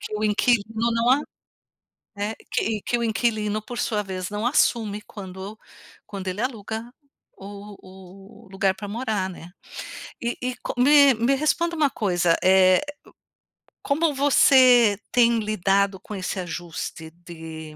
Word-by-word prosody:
que - - -8
o 210 - -4
inquilino 220 +1 +1
não 230 +2 +2
a 275 +3 +4 1.0
é 205 +2 -3 0.2
que 220 -1 -1
que 240 - -1
o 235 - -2
inquilino 215 -2 0
por 240 +3 -9
sua 210 -2 -1
vez, 185 -1 -5
não 210 +3 -3
assume 220 -5 +1
quando 195 +1 -9 0.5
quando 195 -2 -6
ele 185 +4 -4
aluga 225 -1 -4 0.5
o 200 +1 -10 0.7
o - - -17
lugar 195 0 0
pra 205 +1 -8
morar, 215 -4 -2
né. 175 -2 -11 0.7
E 235 0 -3
e 255 0 -2
como 250 0 0
Me 285 -2 +6
me 235 +4 +1
responda 335 +4 0
uma 305 -3 +2
coisa, 180 -8 +1
eh, 185 0 +5 1.0
co 280 - +1
como 320 -4 +1
você 255 -5 +5
tem 235 -1 +4
lidado 200 -2 0
com 210 - -9
esse 185 0 -4
ajuste 170 -2 -6
de 160 -2 -10
210 Hz, 145 wpm, -23 LUFS, 190-240 Hz, 1.0 s, Me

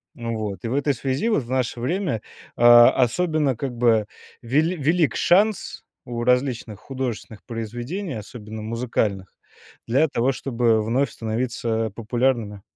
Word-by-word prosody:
Вот. 110 -5 -4
И 115 - -3
в - - -2
этой 145 0 +1
связи 135 - -2
вот 155 - +1
в 120 - -13
наше 125 -2 -1
время, 165 - -1 0.3
а, 120 0 +8
особенно 145 +2 +1
как 135 -3 -4
бы 115 -3 +3 0.4
вели 155 +9 +1
велик 155 -1 +1
шанс 205 +3 +2 0.3
у 120 -1 -3
различных 125 -4 0
художественных 125 -5 -5
произведений, 120 - -5
особенно 110 0 -8
музыкальных, 110 -4 -2 0.5
для 140 +7 +3
того, 130 0 +1
чтобы 115 -4 +1
вновь 125 +5 +1
становиться 115 -1 -2
популярными. 115 -3 -1
120 Hz, 130 wpm, -23 LUFS, 115-135 Hz, 0.5 s, а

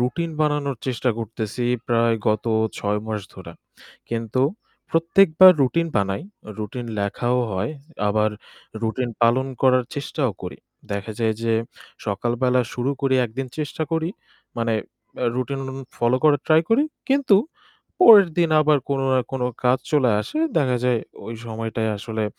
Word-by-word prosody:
routine 165 +7 -1
বানানোর 145 -3 0
চেষ্টা 125 0 0
করতেছি 115 +1 -4 0.2
প্রায় 115 -1 +3
গত 110 +1 0 0.3
৬ 105 0 -1
মাস 110 -1 -3
ধরে। - - -10 0.6
কিন্তু 115 +2 -1 0.5
প্রত্যেকবার 165 +2 +6
routine 165 +5 +1
বানাই, 100 +4 0 0.4
routine 115 +3 -5
লেখাও 120 +5 0
হয় 95 +8 -2 0.4
আবার 110 +1 +2 0.5
routine 120 +2 -2
পালন 120 +3 +3 0.2
করার 130 -1 +4
চেষ্টাও 140 -3 -2
করি। 90 - -7 0.3
দেখা 100 +2 -4
যায় 110 -1 +1
যে 115 -1 +1 0.5
সকালবেলা 120 +5 +1
শুরু 125 +2 -1
করি, 135 -2 +1
একদিন 130 +4 -5
চেষ্টা 150 +1 -3
করি 160 0 0 0.5
মানে 115 -1 0 0.4
অ্যা 125 - -1
routine 135 +2 -2 0.4
follow 120 +2 +2
করার 145 -2 +5
try 155 0 +5
করি। 255 +6 +4 0.3
কিন্তু 270 -7 +4 0.6
পরের 210 - +9
দিন 170 -2 +3
আবার 150 -1 +4
কোনো 135 -1 0
না 130 - +3
কোনো 130 -2 -1 0.2
কাজ 125 +1 +4
চলে 135 -5 +4
আসে। 305 - -5 0.2
দেখা 130 -4 +1
যায় 125 -2 +2 0.3
ওই 115 - -5
সময়টায় 110 0 -3
আসলে 110 +1 -3
125 Hz, 140 wpm, -22 LUFS, 115-145 Hz, 0.6 s, পরের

